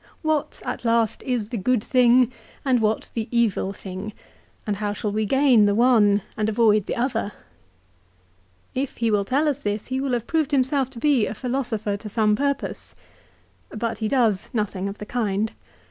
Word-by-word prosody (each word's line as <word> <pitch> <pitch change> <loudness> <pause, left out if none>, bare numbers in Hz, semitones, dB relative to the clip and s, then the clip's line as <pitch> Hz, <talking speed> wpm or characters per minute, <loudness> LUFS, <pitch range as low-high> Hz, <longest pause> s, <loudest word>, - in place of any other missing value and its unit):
What, 310 -2 -1
at - - -4
last, 230 -2 +1
is 240 -5 -1
the 240 - -3
good 225 +2 +1
thing 250 -1 +4 0.3
and 255 -3 +3
what 215 0 0
the 225 -1 -3
evil 230 -5 +1
thing, 190 +1 -7 0.5
and 205 -2 -1
how 205 0 -2
shall 210 0 -3
we 215 0 -1
gain 265 -4 +5
the 200 - +2
one 215 -4 +4
and 215 -1 0
avoid 215 -2 +3
the - - -2
other? 235 -4 -1 1.4
If 265 +1 -3
he 230 -1 +1
will 205 -1 +2
tell 280 +8 +1
us 285 -1 -1
this 205 0 -2
he 260 +1 -1
will 270 -2 -1
have 235 -2 -1
proved 315 0 0
himself 270 -1 +1
to 255 -3 -10
be 270 -4 +3
a - - -5
philosopher 240 -5 -2
to 210 +1 -8
some 210 0 +2
purpose. 280 +3 -3 0.7
But 225 +1 -3
he 220 - -1
does 220 -5 +1
nothing 200 -3 -2
of 200 - -8
the 210 - -7
kind. 215 -2 -1
230 Hz, 180 wpm, -23 LUFS, 210-255 Hz, 1.4 s, gain